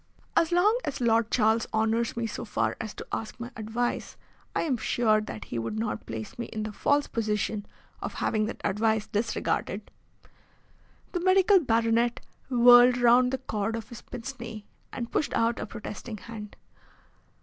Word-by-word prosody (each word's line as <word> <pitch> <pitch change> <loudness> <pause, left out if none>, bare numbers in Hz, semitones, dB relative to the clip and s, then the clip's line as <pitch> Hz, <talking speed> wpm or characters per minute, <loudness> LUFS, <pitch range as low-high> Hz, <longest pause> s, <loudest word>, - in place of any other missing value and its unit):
"As 330 - +3
long 410 +7 +4
as 285 - -3
Lord 230 -2 +3
Charles 220 -1 +2
honours 225 +2 +1
me 235 - 0
so 225 - -4
far 225 - -1
as 220 -2 -5
to - - -7
ask 225 +2 -4
my 240 +1 -6
advice 225 +3 -3 0.4
I - - +1
am 295 -6 +1
sure 220 -1 +2
that 110 - -7
he 120 - -4
would 115 -1 -3
not 110 -1 -3
place 110 - -6
me 235 - -3
in 215 -1 -4
the 215 - -4
false 285 +7 +2
position 210 -2 -2 0.3
of - - -5
having 215 -1 0
that 235 - -6
advice 220 +1 +1
disregarded." 215 +2 -2 1.2
The 355 - -1
medical 380 +2 +5
baronet 230 -3 +2 0.3
whirled 245 0 +7
round 245 +1 +5
the 265 - 0
cord 220 -4 -2
of 225 -1 -6
his 235 -3 -9
pince 260 +2 -7
nez 225 -2 -7 0.3
and 235 -2 -5
pushed 300 - 0
out 230 +1 +1
a - - -4
protesting 215 +1 -7
hand. 210 -1 -9
230 Hz, 170 wpm, -28 LUFS, 215-245 Hz, 1.2 s, whirled